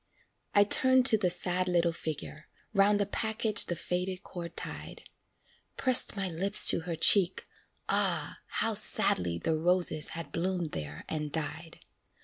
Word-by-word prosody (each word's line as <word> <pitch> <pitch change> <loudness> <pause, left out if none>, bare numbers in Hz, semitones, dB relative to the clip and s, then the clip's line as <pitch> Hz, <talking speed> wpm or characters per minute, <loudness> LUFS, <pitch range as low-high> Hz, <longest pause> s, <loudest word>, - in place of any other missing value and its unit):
I 205 - +6
turned 260 +4 +3
to 240 -4 +6
the 185 -3 0
sad 180 +1 -1
little 175 -1 0
figure, 155 -1 -8 0.3
'Round 205 0 +2
the 205 - 0
package 220 +1 -2
the 175 - -3
faded 180 +3 -5
cord 170 -2 -10
tied; - - -8 0.7
Pressed 255 -4 +3
my 195 -1 -2
lips 190 +4 +5
to - - +3
her 165 0 -6
cheek 185 +2 +3 0.4
ah, - - 0
how - - -1
sadly 85 -2 +1
The 160 - -2
roses 175 -2 0
had 160 -4 -8
bloomed 175 -2 -4
there 75 -1 -8
and 150 -2 -5
died. 160 +1 -7
180 Hz, 145 wpm, -28 LUFS, 160-200 Hz, 0.7 s, I